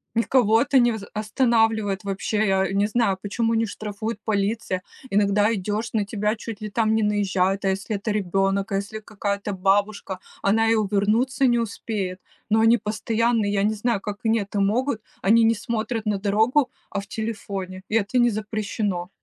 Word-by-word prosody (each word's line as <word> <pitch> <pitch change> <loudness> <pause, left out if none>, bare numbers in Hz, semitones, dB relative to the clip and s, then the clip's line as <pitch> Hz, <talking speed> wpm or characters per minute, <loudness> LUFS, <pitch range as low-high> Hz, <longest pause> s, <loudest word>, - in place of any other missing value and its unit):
Никого 230 -1 +3
это 270 0 +3
не 240 -1 +4
аз 220 -3 -5
останавливает- 220 -2 +1
вообще. 205 +2 -1
Я 190 -1 +1
не 200 +1 +2
знаю, 215 -4 +1
почему 225 +3 -1
не 225 0 +2
штрафует 215 +1 -5
полиция. 205 -2 -1 0.3
Иногда 205 +2 +3
идёшь, 210 +3 -2
на 210 -2 +1
тебя, 210 +1 -1
чуть 225 -2 -7
ли, 215 - -4
там, 220 0 +2
не 220 - +2
наезжают, 195 -2 +1
а - - +3
если 200 +2 -2
это 215 +2 -3
ребёнок? 195 0 0
А 195 - +1
если 210 +2 -5
какая-то 205 -1 -3
бабушка? 195 0 0 0.2
Она 225 +3 +3
и - - +4
увернуться 220 +6 +2
не 240 -1 +3
успеет. 200 -4 -3 0.3
Но 220 +1 +3
они 230 +2 +5
постоянно 225 +1 0
я 200 -1 +1
не 215 +1 +2
знаю, 220 0 0
как 205 0 -6
они 225 +1 +3
это 200 0 -3
могут, 225 +3 0 0.2
они 225 +4 +5
не 225 - +5
смотрят 225 +1 -3
на 210 -1 +1
дорогу, 220 +8 +2 0.2
а 200 - -2
в 200 - -13
телефоне, 200 -4 -5
и 215 - -1
это- 225 +3 +1
не 240 0 +5
запрещено. 210 -4 -3
210 Hz, 180 wpm, -24 LUFS, 200-225 Hz, 0.3 s, они